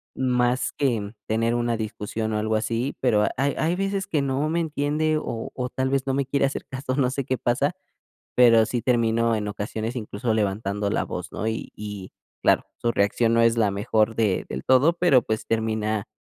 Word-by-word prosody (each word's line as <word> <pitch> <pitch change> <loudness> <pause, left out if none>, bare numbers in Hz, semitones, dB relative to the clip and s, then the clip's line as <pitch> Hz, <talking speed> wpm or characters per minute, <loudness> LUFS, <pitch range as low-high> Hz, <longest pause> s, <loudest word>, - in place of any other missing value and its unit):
más 125 -1 +1
que 115 -7 -1
tener 115 +2 +1
una 120 -1 0
discusión 110 0 -3
o 105 - 0
algo 110 +1 0
así. 115 +5 -1
Pero 105 -5 +3
hay 140 +1 +1
hay 165 +3 +1
veces 195 0 -1
que 150 - 0
no 140 +2 0
me 170 - 0
entiende 155 0 0
o 115 -6 -4
o 125 -1 -3
tal 130 +1 -1
vez 135 0 0
no 135 - 0
me 135 -1 0
quiere 140 0 +2
hacer 135 - -3
caso, 130 0 -3
no 135 -3 +2
sé 135 +1 -3
qué 130 0 -1
pasa, 140 +7 0 0.6
pero 115 -3 +6
sí 120 +1 -2
termino, 115 -2 +2
en 105 -1 -2
ocasiones, 110 +4 -4
incluso 110 0 -2
levantando 100 -1 -1
la 105 - 0
voz, 90 -1 -6
¿no? - - -3
Y 110 0 -3
y 105 -3 -7 0.3
claro, - - +4
su 120 - 0
reacción 115 +3 +2
no 115 - +4
es 115 0 +4
la 110 -3 +3
mejor 110 +2 +1
de 105 -5 +1
del 65 +1 -5
todo, 135 +6 +4
pero 170 -7 +4
pues 110 -1 -3
termina, 110 -2 -1
115 Hz, 200 wpm, -24 LUFS, 110-135 Hz, 0.6 s, pero